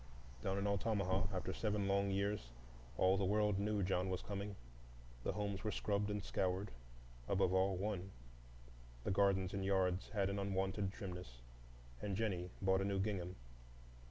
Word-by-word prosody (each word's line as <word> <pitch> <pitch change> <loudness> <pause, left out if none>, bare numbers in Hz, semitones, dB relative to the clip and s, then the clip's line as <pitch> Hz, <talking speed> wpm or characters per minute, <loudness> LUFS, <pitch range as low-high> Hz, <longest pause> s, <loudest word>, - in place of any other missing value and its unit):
Down 95 0 0
in 100 - 0
Altamaha, 100 -1 +1
after 95 -2 -2
seven 105 -2 0
long 100 0 +2
years, 100 -8 0 0.5
all 95 +1 +5
the 100 - +1
world 105 0 +3
knew 105 0 +1
John 90 0 +1
was 90 - -2
coming. 100 0 -4 0.7
The - - 0
homes 100 -2 -2
were 110 - 0
scrubbed 105 0 0
and 105 -1 -2
scoured,—above 60 - -1
all, 95 +1 +3
one; 95 -1 -2 0.9
the - - 0
gardens 95 -1 +3
and 100 -1 -1
yards 95 -1 +2
had 100 -2 +1
an 100 - -1
unwonted 95 0 0
trimness, 90 - -7 0.6
and 100 -2 -1
Jennie 95 -5 0
bought 95 0 +4
a - - +1
new 100 0 0
gingham. 95 -3 -1
95 Hz, 155 wpm, -39 LUFS, 95-100 Hz, 0.9 s, all